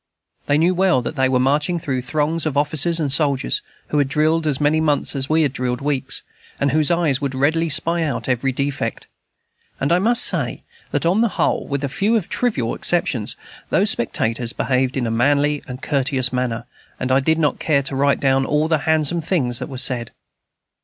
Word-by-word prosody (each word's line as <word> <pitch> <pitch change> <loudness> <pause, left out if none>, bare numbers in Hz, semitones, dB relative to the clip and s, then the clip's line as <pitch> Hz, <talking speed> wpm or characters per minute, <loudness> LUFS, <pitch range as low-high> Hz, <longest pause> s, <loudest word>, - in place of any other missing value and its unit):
They 145 - +3
knew 170 +4 +2
well 180 -8 +2
that - - -4
they 130 -3 +1
were 130 - +2
marching 145 +7 +1
through 135 -6 -3
throngs 155 +4 -1
of 145 -2 -3
officers 155 +3 +2
and 145 -4 0
soldiers 140 - +1 0.3
who 150 - 0
had 140 - +2
drilled 155 +3 +1
as 140 -3 0
many 150 +2 +2
months 150 -1 +1
as 135 0 -3
we 160 +1 +3
had 140 -3 -1
drilled 125 -1 -2
weeks, 140 -1 -1 0.4
and 140 -1 +1
whose 155 +1 +2
eyes 165 -6 +1
would 140 -2 -3
readily 160 +5 +1
spy 170 +3 +2
out 155 -3 -3
every 130 +1 0
defect. 140 -3 -3 0.7
And 140 - -1
I 175 - +4
must 230 +5 +4
say, - - 0 0.3
that, - - -2
on 185 +6 +2
the 235 - +3
whole, - - 0
with 140 -1 -3
a - - 0
few 210 - +1
trivial 170 - -1
exceptions, 130 -11 0 0.3
those - - +3
spectators 115 +1 -1
behaved 130 0 -1
in 125 - -1
a 115 - -2
manly 145 +5 +1
and 130 0 -8
courteous 130 -3 +1
manner, 120 -2 -2 0.3
and 130 0 -2
I 130 - +4
do 160 +4 +1
not 150 -4 0
care 140 -3 +1
to 135 0 -3
write 140 +1 +2
down 135 -1 +2
all 150 +3 0
the 160 -2 +1
handsome 160 +1 +2
things 135 -8 -1
that - - -6
were 130 - -7
said. 125 -2 +1
145 Hz, 200 wpm, -20 LUFS, 130-160 Hz, 0.7 s, I